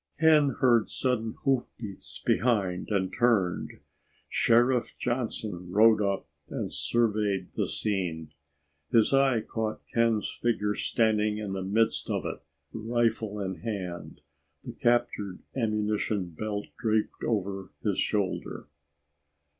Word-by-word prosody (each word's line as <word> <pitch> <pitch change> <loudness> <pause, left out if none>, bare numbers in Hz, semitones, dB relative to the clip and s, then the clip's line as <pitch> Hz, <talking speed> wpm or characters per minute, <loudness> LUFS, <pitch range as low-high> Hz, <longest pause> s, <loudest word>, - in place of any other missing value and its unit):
Ken 150 -3 +5
heard 120 -4 +4
sudden 115 -4 -1
hoofbeats 100 - -3
behind 95 -5 +1
and 95 -3 0
turned. 110 -7 +1 0.5
Sheriff 120 +1 +3
Johnson 110 -7 -3
rode 110 +2 +6
up 100 -6 -1 0.2
and - - -4
surveyed 105 -5 0
the - - -1
scene. 85 -7 -2 0.6
His 115 +3 +4
eye 135 -4 +4
caught 110 0 -4
Ken's 115 -2 +2
figure 105 -3 0
standing 105 -1 +1
in 105 -2 -4
the 95 - -3
midst 110 +4 +1
of - - -1
it, - - -4 0.3
rifle 115 -2 0
in 95 -2 -3
hand, 95 -9 -5 0.4
the - - -6
captured 120 -6 0
ammunition 105 -5 0
belt 105 +4 -4
draped 110 -2 0
over 100 -3 -2
his - - 0
shoulder. 100 -3 -1
110 Hz, 115 wpm, -28 LUFS, 100-115 Hz, 0.6 s, rode